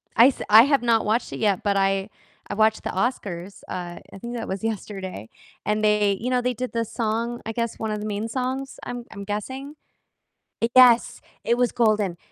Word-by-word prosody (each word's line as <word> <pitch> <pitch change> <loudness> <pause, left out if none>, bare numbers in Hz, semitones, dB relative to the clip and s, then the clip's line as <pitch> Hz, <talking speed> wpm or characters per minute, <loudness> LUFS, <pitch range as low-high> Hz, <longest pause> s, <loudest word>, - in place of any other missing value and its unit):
I 235 +3 +8
s 275 - -1
I 220 +2 +9
have 280 -1 +3
not 230 -2 +2
watched 220 +3 0
it - - -5
yet, 205 -4 +1
but 200 -1 +1
I 195 +1 +1 0.4
I 205 - -4
watched 220 +1 +2
the - - -3
Oscars, 195 -4 -3
uh, 175 -1 -5
I - - -10
think 235 +4 -6
that 230 - -4
was 190 +2 -4
yesterday, 190 - -5 0.4
and 210 0 0
they 210 -2 +3
you 250 +3 -2
know, 250 -1 +2
they 250 0 0
did 250 +2 -5
the 230 - 0
song, 230 +1 -2
I 225 - -3
guess 230 -1 -3
one 220 -1 -2
of 210 - -2
the 210 - -5
main 210 +1 -2
songs, 260 +3 -3
I'm 245 -1 -6
I'm 200 -2 -7
guessing. 260 +8 -5 1.0
Yes, 245 -2 +6 0.2
it 235 - +2
was 245 -1 +2
Golden, 215 -6 +1
220 Hz, 205 wpm, -24 LUFS, 200-240 Hz, 1.0 s, I